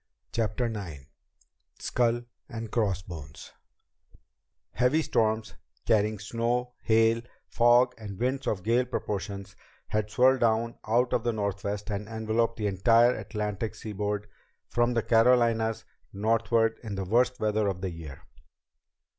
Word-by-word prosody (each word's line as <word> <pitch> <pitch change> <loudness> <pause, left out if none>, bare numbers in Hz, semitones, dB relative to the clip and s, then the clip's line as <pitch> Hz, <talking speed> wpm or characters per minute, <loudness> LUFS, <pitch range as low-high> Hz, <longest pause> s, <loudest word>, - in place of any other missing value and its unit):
CHAPTER 115 +2 -1
IX 95 - -5 0.7
Skull 120 -1 0 0.3
and 115 -3 -6
Crossbones 90 - -3 1.2
Heavy 145 +6 +2
storms, 110 -3 0 0.3
carrying 105 0 +2
snow, 120 +4 -2
hail, 115 +1 +3 0.2
fog, 120 +1 +4
and 100 -3 -7
winds 130 +3 -1
of 95 -4 -1
gale 120 +3 +2
proportions 100 -4 -4 0.3
had 105 0 -1
swirled 130 +4 +4
down 115 0 +1
out 120 +3 +2
of 115 - +1
the 120 -1 0
northwest 100 0 -3
and 100 0 -3
enveloped 115 +1 -1
the 105 - -2
entire 115 +5 +4
Atlantic 105 -1 -4
seaboard 105 -1 -3 0.4
from 120 0 +1
the 115 - +1
Carolinas 115 -2 +3 0.3
northward 115 +2 +1
in 110 -4 -5
the 95 -1 -3
worst 125 +5 +2
weather 110 -1 +1
of 95 -2 -2
the 95 -1 -2
year. 80 -5 -9
110 Hz, 125 wpm, -28 LUFS, 105-120 Hz, 1.2 s, fog